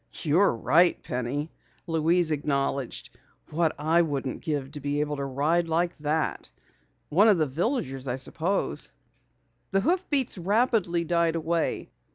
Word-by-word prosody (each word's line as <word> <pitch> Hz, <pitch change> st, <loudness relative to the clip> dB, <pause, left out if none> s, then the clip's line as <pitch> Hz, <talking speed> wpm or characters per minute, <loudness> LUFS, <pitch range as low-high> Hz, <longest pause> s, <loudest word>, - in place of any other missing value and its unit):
"You're 165 Hz, -1 st, +3 dB
right, 170 Hz, +9 st, +3 dB
Penny," 130 Hz, +5 st, -3 dB, 0.3 s
Louise 165 Hz, 0 st, +2 dB
acknowledged. 140 Hz, -3 st, -2 dB, 0.4 s
"What 160 Hz, 0 st, +1 dB
wouldn't 150 Hz, -4 st, +1 dB
I -, -, -15 dB
give 145 Hz, -4 st, -3 dB
to 150 Hz, -, -7 dB
be 145 Hz, +1 st, -2 dB
able 150 Hz, -1 st, -2 dB
to 140 Hz, -, -3 dB
ride 150 Hz, +6 st, +1 dB
like 170 Hz, +2 st, 0 dB
that! 150 Hz, +1 st, -1 dB, 0.6 s
One 200 Hz, +8 st, +5 dB
of 210 Hz, -4 st, +5 dB
the 155 Hz, -, +2 dB
villagers, 140 Hz, -, -2 dB
I 125 Hz, -, -1 dB
suppose." 165 Hz, +8 st, -2 dB, 0.8 s
The 195 Hz, 0 st, +2 dB
hoofbeats 290 Hz, -, 0 dB
rapidly 200 Hz, -3 st, +1 dB
died 170 Hz, 0 st, +1 dB
away. 165 Hz, 0 st, -1 dB
160 Hz, 135 wpm, -27 LUFS, 145-175 Hz, 0.8 s, One